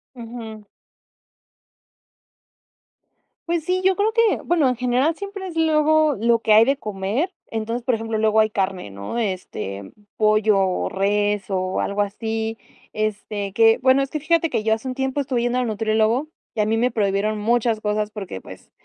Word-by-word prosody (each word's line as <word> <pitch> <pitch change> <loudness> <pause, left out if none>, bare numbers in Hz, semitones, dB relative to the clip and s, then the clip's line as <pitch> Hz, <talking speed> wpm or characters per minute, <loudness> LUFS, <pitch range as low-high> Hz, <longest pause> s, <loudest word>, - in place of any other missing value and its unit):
Ujú. 225 -3 -9 2.8
Pues 340 -2 0
sí, 365 +3 0
yo 380 0 +4
creo 415 +3 +1
que, 460 -2 +3
bueno, 325 -6 +3
en 250 - 0
general 250 +6 +1
siempre 400 0 -6
es 345 - -8
luego 310 -1 +3
lo 230 +1 +3
que 220 -1 +2
hay 220 +2 +7
de 275 +2 +1
comer. 210 - -2 0.2
Entonces, 230 +2 -3
por 250 -1 +1
ejemplo, 225 0 -3
luego 220 0 +3
hay 215 0 +3
carne, 190 - -2
¿no?, 100 - -7
de, 220 -5 0
este, 100 - -7 0.3
pollo 215 -1 +3
o 190 -1 0
res 205 +1 0
o 185 -1 -1
algo 200 +1 -1
así. 220 +2 -4 0.3
Este, 210 -1 -3
que 225 +1 +5
bueno, 260 +1 +4
es 275 - -6
que 305 - -2
fíjate 330 +1 +1
que 215 - -1
yo 220 0 +3
hace 225 +4 -8
un 255 - -2
tiempo 265 +1 -2
estuve 260 -3 -1
yendo 245 +1 0
al 250 - +1
nutriólogo 220 +5 +1 0.2
y - - -6
a 210 - +1
mí 225 +1 +1
me 245 +2 +1
prohibieron 210 0 0
muchas 230 0 +1
cosas 210 0 -1
porque, 195 - -6
pues, - - -13
225 Hz, 180 wpm, -22 LUFS, 210-265 Hz, 2.8 s, hay